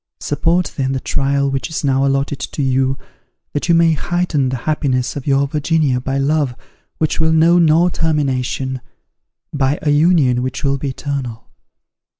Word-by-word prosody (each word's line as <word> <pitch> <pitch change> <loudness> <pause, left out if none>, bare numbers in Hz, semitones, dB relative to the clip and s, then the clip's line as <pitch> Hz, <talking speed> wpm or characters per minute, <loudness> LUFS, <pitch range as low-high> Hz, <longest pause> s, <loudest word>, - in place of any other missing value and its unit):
Support, 165 +5 0
then, 135 -1 0
the 135 - -1
trial 140 +1 0
which 135 +4 -3
is 160 - -4
now 135 -1 +2
allotted 135 +1 -1
to 145 - -4
you, 130 0 +1 0.6
that 145 +4 -3
you 170 - +5
may 165 0 +4
heighten 155 -4 -1
the 130 - -2
happiness 130 -5 0
of 140 -1 -6
your 140 0 +2
Virginia 150 -2 0
by 135 +2 -2
love 140 -2 0 0.4
which 155 0 -1
will 160 0 +2
know 165 +2 +4
no 165 +1 +4
termination, 135 -6 -1 0.7
by 140 0 +1
a 150 - +2
union 145 -5 +3
which 130 +3 -4
will 140 -1 0
be 140 - -3
eternal. 130 -4 -5
140 Hz, 160 wpm, -18 LUFS, 135-155 Hz, 0.7 s, you